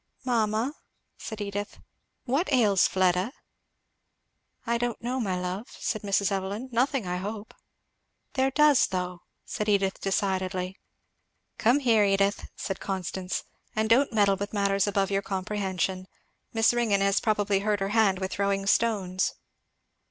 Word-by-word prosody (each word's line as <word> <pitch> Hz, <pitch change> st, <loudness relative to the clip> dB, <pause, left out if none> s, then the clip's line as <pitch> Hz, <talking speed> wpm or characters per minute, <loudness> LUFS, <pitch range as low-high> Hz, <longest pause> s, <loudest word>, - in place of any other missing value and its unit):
"Mamma," 230 Hz, +1 st, +1 dB, 0.5 s
said 220 Hz, -2 st, -6 dB
Edith, 205 Hz, 0 st, -4 dB, 0.5 s
"what 275 Hz, +7 st, 0 dB
ails 210 Hz, -8 st, +4 dB
Fleda?" 185 Hz, +5 st, +1 dB, 1.3 s
"I 235 Hz, 0 st, 0 dB
don't 240 Hz, -1 st, -2 dB
know, 250 Hz, +2 st, -2 dB
my 190 Hz, -6 st, -1 dB
love," 180 Hz, +5 st, -4 dB
said 215 Hz, -, -2 dB
Mrs. 200 Hz, 0 st, +1 dB
Evelyn. 200 Hz, +6 st, -3 dB
"Nothing, 250 Hz, 0 st, +1 dB
I 180 Hz, 0 st, -2 dB
hope." 205 Hz, +3 st, -6 dB, 0.8 s
"There 265 Hz, 0 st, +2 dB
does, 295 Hz, -1 st, +5 dB
though," 180 Hz, -1 st, -3 dB, 0.3 s
said 210 Hz, 0 st, -3 dB
Edith 195 Hz, -2 st, +1 dB
decidedly. 190 Hz, -1 st, -1 dB, 0.8 s
"Come 250 Hz, +6 st, +3 dB
here, 230 Hz, -5 st, +4 dB
Edith," 200 Hz, 0 st, +1 dB
said 195 Hz, -, -4 dB
Constance, 190 Hz, -1 st, -3 dB, 0.3 s
"and 220 Hz, 0 st, +1 dB
don't 265 Hz, +4 st, +4 dB
meddle 200 Hz, -3 st, +3 dB
with 200 Hz, +2 st, -5 dB
matters 200 Hz, -1 st, +2 dB
above 195 Hz, -1 st, 0 dB
your 195 Hz, 0 st, +1 dB
comprehension. 190 Hz, -1 st, -2 dB, 0.4 s
Miss 225 Hz, +1 st, +3 dB
Ringgan 225 Hz, -5 st, +2 dB
has 200 Hz, 0 st, +3 dB
probably 205 Hz, -2 st, +1 dB
hurt 205 Hz, 0 st, 0 dB
her 195 Hz, 0 st, -1 dB
hand 205 Hz, -3 st, +3 dB
with 190 Hz, 0 st, -3 dB
throwing 200 Hz, 0 st, 0 dB
stones." 195 Hz, -4 st, +1 dB
200 Hz, 135 wpm, -27 LUFS, 190-225 Hz, 1.3 s, does